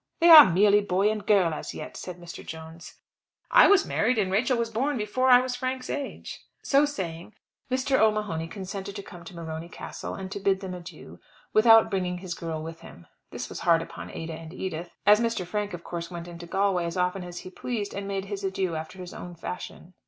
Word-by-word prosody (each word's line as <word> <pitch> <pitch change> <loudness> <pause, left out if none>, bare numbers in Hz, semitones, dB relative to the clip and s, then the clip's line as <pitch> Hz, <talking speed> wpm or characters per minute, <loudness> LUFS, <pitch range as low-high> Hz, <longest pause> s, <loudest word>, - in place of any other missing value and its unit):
"They 340 0 +5
are 300 - +11
merely 205 +3 +5
boy 200 +1 +1
and 215 -1 -4
girl 195 -5 +3
as - - -6
yet," - - -7
said 180 -1 -7
Mr. 175 -1 -9
Jones. 160 +1 -10 0.6
"I - - +8
was 395 -1 +5
married, 230 +3 +1
and 195 -3 +1
Rachel 240 +6 +2
was 230 -1 -2
born 270 +5 0
before 240 +5 0
I 250 0 +8
was 255 -1 -3
Frank's 255 0 -3
age." 285 -2 -5 0.2
So 280 +1 +4
saying, 180 - -6 0.3
Mr. 265 +1 +1
O'Mahony 210 -7 +1
consented 195 +2 -6
to 200 - -6
come 175 -3 -12
to 175 - -10
Morony 165 0 -6
Castle, - - -7
and 190 0 -7
bid 195 -1 +2
them 190 -2 -5
adieu, 175 -1 -10 0.3
without 225 0 +6
bringing 180 -2 -1
his 180 -1 -5
girl 160 -2 -5
with 165 +1 -8
him. 85 - -14 0.2
This - - -6
was - - -7
hard 165 -1 +3
upon - - -9
Ada 165 0 -6
and 160 +2 -9
Edith, 175 -2 -5 0.2
as 210 +1 +7
Mr. 230 -6 -1
Frank, 205 +3 -3
of 170 - -11
course, 170 -1 -5
went 170 -1 -7
into 170 0 -9
Galway 190 -1 +1
as 170 +1 -4
often 180 +1 0
as 175 0 -7
he 185 - -10
pleased, 210 0 -4
and 200 0 -5
made 195 -1 -3
his 200 0 -6
adieu 190 -2 -1
after 160 +4 -6
his 180 -1 -8
own 175 0 -8
fashion. 180 +1 -8
190 Hz, 210 wpm, -26 LUFS, 170-215 Hz, 0.6 s, are